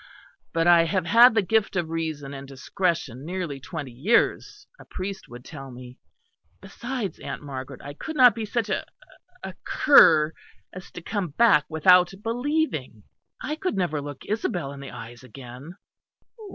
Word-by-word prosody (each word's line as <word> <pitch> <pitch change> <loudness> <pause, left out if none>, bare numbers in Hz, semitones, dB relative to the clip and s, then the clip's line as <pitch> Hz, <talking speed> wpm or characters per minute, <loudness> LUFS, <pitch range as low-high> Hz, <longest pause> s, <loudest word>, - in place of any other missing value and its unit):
"But 165 0 0
I 170 -1 +6
have 185 0 -1
had 235 +5 +6
the 220 - +3
gift 215 +1 0
of 170 -3 -2
reason 155 -4 -4
and 135 0 -8
discretion 140 -1 -3
nearly 170 -4 -4
twenty 140 -1 -7
years, 225 - 0
a - - -12
priest 195 +1 -7
would 120 +1 -12
tell 135 -3 -9
me. 125 0 -12 0.6
Besides, 240 -4 -6
Aunt - - -7
Margaret, 135 -1 -8
I 145 - -8
could 315 - -7
not 250 -4 +7
be 225 - -5
such 220 +1 -2
a 190 - -1 0.6
a - - -6
cur 160 - +5 0.4
as 185 0 -10
to 175 - -9
come 200 -2 -2
back 195 -2 +4
without 180 +3 +4
believing. 290 +8 -2 0.4
I 300 - -3
could 365 - -3
never 155 -6 -1
look 145 -1 -9
Isabel 180 -9 -2
in 140 - -10
the 140 -1 -8
eyes 120 0 -10
again." 130 +5 -11
165 Hz, 160 wpm, -25 LUFS, 140-215 Hz, 0.6 s, not